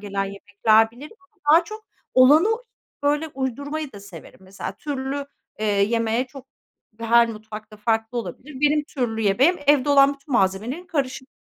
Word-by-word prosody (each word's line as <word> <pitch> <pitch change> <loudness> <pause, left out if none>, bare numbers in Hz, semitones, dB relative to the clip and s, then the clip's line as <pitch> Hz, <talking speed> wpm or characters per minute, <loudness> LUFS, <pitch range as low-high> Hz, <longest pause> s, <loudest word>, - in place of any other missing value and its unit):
gelen 200 -1 -3
yemekler 205 +3 +2
bilirim 285 - -13
ama 375 +1 -31
daha 335 +2 +6
çok 430 +4 -10 0.3
olanı 290 +8 +6 0.6
böyle 295 +2 +1
uydurmayı 285 +2 -4
da 200 - -11
severim. 195 -4 -13
Mesela 190 0 -7
türlü, 280 +1 -4 0.3
eee, 215 - -3
yemeği 225 +4 +1
çok 270 0 -13 0.5
her 235 +1 +4
mutfak 215 -1 -9
da - - -11
farklı 225 +2 -1
olabilir. 260 - -8
Benim 295 0 +2
türlü 240 -6 -3
yemeğim, 255 - +3
evde 290 -1 +4
olan 280 0 +5
bütün 275 +1 -12
malzemelerin 220 - 0
karışımı, 265 -5 -3
255 Hz, 150 wpm, -23 LUFS, 215-290 Hz, 0.6 s, daha